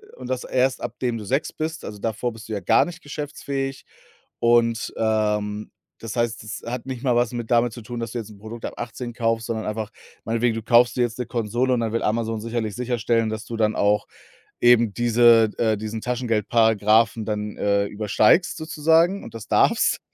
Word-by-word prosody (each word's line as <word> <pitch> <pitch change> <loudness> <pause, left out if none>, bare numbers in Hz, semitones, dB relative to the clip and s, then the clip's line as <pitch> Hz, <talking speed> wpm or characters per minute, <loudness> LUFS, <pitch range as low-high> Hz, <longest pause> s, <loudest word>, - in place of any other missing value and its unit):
und - - -9
das 130 -1 -2
erst 130 0 +1
ab - - -5
dem 120 -2 -1
du 105 - -7
6 135 +9 -1
bist. 160 +1 -4
Also, 105 -1 -7
davor 115 +3 -2
bist 110 0 -11
du 110 - -5
ja 100 - -3
gar - - +4
nicht 170 -1 -9
geschäftsfähig, 140 -2 -5 0.5
und, 115 -1 +2
ähm, 105 -1 0 0.3
das 115 -1 -6
heißt, 115 -2 -1
das 110 +1 -6
hat 125 -1 -4
nicht 130 -2 -6
mal 125 -3 +2
was 120 0 +1
mit 120 -1 -5
damit 120 -1 +3
zu 120 - -9
tun, 120 +2 -6
dass 115 -2 -5
du 120 - -2
jetzt 110 -2 -7
'n 105 - -14
Produkt 110 +2 -9
ab - - -6
18 120 0 -5
kaufst, 115 0 -1
sondern 110 -2 -3
einfach 110 +1 -4 0.3
meinetwegen, 115 0 0
du 115 - -4
kaufst 120 +1 +4
dir 125 - 0
jetzt 120 0 -1
'ne 125 - -2
Konsole 120 +3 0
und 120 - +1
dann 115 -1 -1
will 115 - -1
Amazon 110 0 -1
sicherlich 115 -2 -3
sicherstellen, 115 -2 0
dass 110 0 -5
du 115 - -6
dann 110 -1 +1
auch 105 +1 +2 0.5
eben 120 -3 +5
diese 115 -1 +5
äh, 110 -2 +2
diesen 110 +1 -5
Taschengeldparagraphen 110 -2 +2
dann, 105 -1 -3
äh, 100 0 +1
übersteigst 105 - +2
sozusagen 165 +4 +2
und - - -11
das 115 - -8
darfst. - - +3
115 Hz, 205 wpm, -23 LUFS, 110-120 Hz, 0.5 s, eben